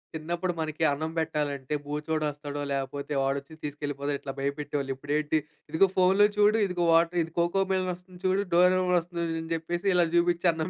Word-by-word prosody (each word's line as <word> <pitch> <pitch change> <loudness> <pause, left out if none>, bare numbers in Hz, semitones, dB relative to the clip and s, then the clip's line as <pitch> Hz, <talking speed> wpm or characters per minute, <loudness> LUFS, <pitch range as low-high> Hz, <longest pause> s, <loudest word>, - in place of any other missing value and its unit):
చిన్నప్పుడు 170 +3 -2
మనకి 155 +1 -3
అన్నం 160 +3 -3
పెట్టాలంటే 150 -3 -2
బూచోడొస్తాడో, 150 -1 -3
లేపోతే 140 +1 -3
వాడొచ్చి 140 +3 -2
తీసుకెళ్ళిపోతాడు 145 -1 -3
ఇట్లా 135 - -5
భయపెట్టేవాళ్ళు. 140 -1 -2
ఇప్పుడేంటి 150 +2 0 0.3
ఇదిగో 190 +4 +4
ఫోన్‌లో 190 +3 +5
చూడు, 210 +1 +5
ఇదిగో 175 -2 -1
వాటర్ 170 +1 +3
ఇది 165 - -10
'కోకోమెలన్' 185 +1 +1
వస్తుంది 180 0 -16
చూడు, 190 +2 +2
'డోరెమాన్' 180 0 +4
వస్తుంది 170 0 -4 0.2
అని 165 - -9
చెప్పేసి 175 +4 -3
ఇలా 175 -1 +5
చూపించి 175 +1 +3
అన్నం 160 +2 -3
160 Hz, 150 wpm, -28 LUFS, 145-180 Hz, 0.3 s, ఫోన్‌లో